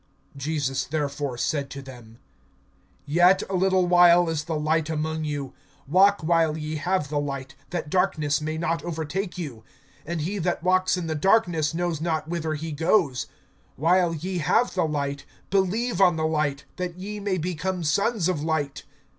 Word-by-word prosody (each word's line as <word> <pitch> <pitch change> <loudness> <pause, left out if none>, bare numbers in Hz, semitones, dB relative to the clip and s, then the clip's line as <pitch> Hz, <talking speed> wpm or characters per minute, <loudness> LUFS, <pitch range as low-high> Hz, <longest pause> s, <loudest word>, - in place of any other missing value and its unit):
(35)Jesus 140 -2 -2
therefore 145 -3 -2
said 140 +2 -1
to 140 - -7
them: 120 -4 -12 0.9
Yet 175 +5 +4
a - - 0
little 185 0 +3
while 175 -1 +6
is 155 -2 -2
the 160 -2 -2
light 155 +1 +1
among 160 0 -2
you. 145 -3 -4 0.3
Walk 195 +6 +4
while 165 -1 +2
ye 155 0 -4
have 175 -1 -1
the 145 0 0
light, 135 -2 -4 0.2
that 175 -3 -3
darkness 155 -6 +1
may 155 +1 -3
not 165 0 -1
overtake 175 +3 -3
you; 135 -11 -6 0.4
and 170 0 -3
he 195 +6 -2
that 175 -1 -1
walks 185 0 +3
in 180 - -3
the 160 - -2
darkness 165 -2 +2
knows 170 -3 -1
not 160 -2 -1
whither 160 -2 -2
he 160 +2 -5
goes. 160 - +1 0.5
(36)While 165 0 +2
ye 185 -1 -2
have 225 +10 +2
the 180 -4 +1
light, 140 -2 -2 0.3
believe 200 +3 +1
on 180 -3 +5
the 160 0 -1
light, 150 -3 -1
that 180 -1 -4
ye 205 +3 -6
may 200 -2 -1
become 180 +1 -2
sons 200 +4 +1
of 180 -5 -1
light. 150 -3 -1
160 Hz, 170 wpm, -25 LUFS, 150-180 Hz, 0.9 s, while